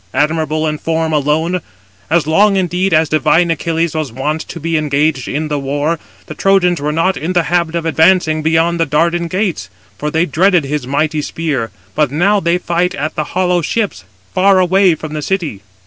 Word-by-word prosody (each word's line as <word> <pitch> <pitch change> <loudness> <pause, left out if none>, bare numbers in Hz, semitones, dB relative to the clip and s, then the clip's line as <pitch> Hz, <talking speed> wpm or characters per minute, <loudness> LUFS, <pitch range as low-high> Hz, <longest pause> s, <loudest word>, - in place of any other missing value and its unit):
admirable 155 +2 0
in 155 -1 -2
form 160 -1 -1
[alone]. 155 +5 0 0.5
As 165 -1 +2
long, 195 +6 +3
indeed, 185 +1 0
as 160 0 +3
divine 155 +3 +2
Achilles 165 +1 -1
was 155 -5 -3
wont 150 +6 -2
to 170 - -8
be 165 +1 -2
engaged 150 -2 0
in 155 +2 -2
the 150 -1 -2
war, 145 +4 -1 0.3
the - - -8
Trojans 180 -4 +2
were 150 +1 -1
not 165 +4 +1
in 170 +4 -3
the 175 -2 +2
habit 170 0 0
of 170 -1 -2
advancing 160 -1 +3
beyond 165 +2 +1
the 165 - +1
Dardan 170 +4 +1
gates; 185 - -2 0.3
for 150 - -2
they 160 +3 +1
dreaded 180 +2 +2
his 140 -2 -3
mighty 150 +2 0
spear; 145 -7 -3 0.2
but 150 -2 +1
now 185 +9 +2
they 170 -1 +1
fight 180 0 -1
at 155 +2 -3
the 155 - -2
hollow 180 -1 +2
ships, 190 - -2 0.3
far 195 +1 +4
away 185 -1 +3
from 155 0 -8
the 155 - -3
city." 160 - -2
160 Hz, 190 wpm, -15 LUFS, 150-175 Hz, 0.5 s, far